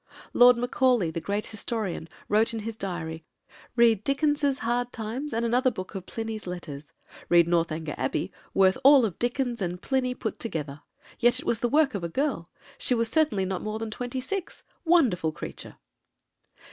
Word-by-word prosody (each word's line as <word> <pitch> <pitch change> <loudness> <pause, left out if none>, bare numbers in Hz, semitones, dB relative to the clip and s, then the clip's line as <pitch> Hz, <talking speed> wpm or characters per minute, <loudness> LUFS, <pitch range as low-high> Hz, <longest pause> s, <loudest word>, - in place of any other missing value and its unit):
Lord 245 0 +7
Macaulay, 245 -6 +2
the 165 - -4
great 205 +4 -2
historian, 210 -6 -4 0.2
wrote 220 +2 +2
in 225 - -3
his 225 +1 -5
diary: 165 -5 -5 0.5
"Read 230 -4 +4
Dickens's 285 0 +1
Hard 245 +1 0
Times, 240 +7 -4
and 230 +1 -1
another 250 +3 +3
book 185 -5 -7
of 190 -2 -7
Pliny's 225 -3 -5
Letters. 155 -5 -7 0.4
Read 170 -1 +6
Northanger 165 -2 0
Abbey, 130 - -1 0.2
worth 190 +3 +3
all 270 -3 +7
Dickens 240 +2 -2
and 180 -1 -2
Pliny 255 +3 -1
put 220 -5 -4
together. 150 -9 -4 0.4
Yet 240 0 +4
it - - -9
was 230 - 0
the 240 - 0
work 290 0 +3
of 200 -4 -4
a 170 - -2
girl. 265 - -1 0.3
She 250 - +1
was 230 -1 0
certainly 225 -10 +2
not 185 -1 -3
more 215 0 -3
than 220 0 -5
twenty 245 +3 -4
six. 375 +7 -5 0.2
Wonderful 240 - +3
creature!" - - -9
225 Hz, 170 wpm, -27 LUFS, 180-250 Hz, 0.5 s, Lord